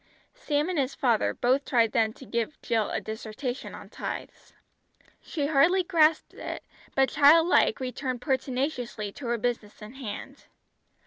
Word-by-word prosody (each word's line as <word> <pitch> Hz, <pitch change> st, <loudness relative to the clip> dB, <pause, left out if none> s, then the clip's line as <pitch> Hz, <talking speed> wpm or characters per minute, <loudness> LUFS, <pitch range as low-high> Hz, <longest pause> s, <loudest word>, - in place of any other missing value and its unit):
Sam 300 Hz, -11 st, -1 dB
and 360 Hz, -4 st, -1 dB
his 265 Hz, -1 st, -1 dB
father 235 Hz, -5 st, +2 dB
both 260 Hz, +3 st, +1 dB
tried 230 Hz, -5 st, +2 dB
then 220 Hz, -1 st, +2 dB
to 265 Hz, -, -13 dB
give 235 Hz, +5 st, -3 dB
Jill 225 Hz, -3 st, +1 dB
a -, -, -1 dB
dissertation 225 Hz, +4 st, -5 dB
on -, -, -10 dB
tithes. -, -, -7 dB, 0.7 s
She 295 Hz, -4 st, -3 dB
hardly 320 Hz, +6 st, +4 dB
grasped 325 Hz, -3 st, +3 dB
it, -, -, -6 dB, 0.3 s
but 270 Hz, -1 st, +4 dB
child 310 Hz, +3 st, +6 dB
like 365 Hz, +4 st, +3 dB
returned 255 Hz, -1 st, -3 dB
pertinaciously 250 Hz, -4 st, -2 dB
to 250 Hz, +4 st, -8 dB
her 235 Hz, 0 st, +1 dB
business 230 Hz, -2 st, -3 dB
in 210 Hz, +2 st, -10 dB
hand. 250 Hz, -7 st, -8 dB
260 Hz, 150 wpm, -27 LUFS, 235-295 Hz, 0.7 s, child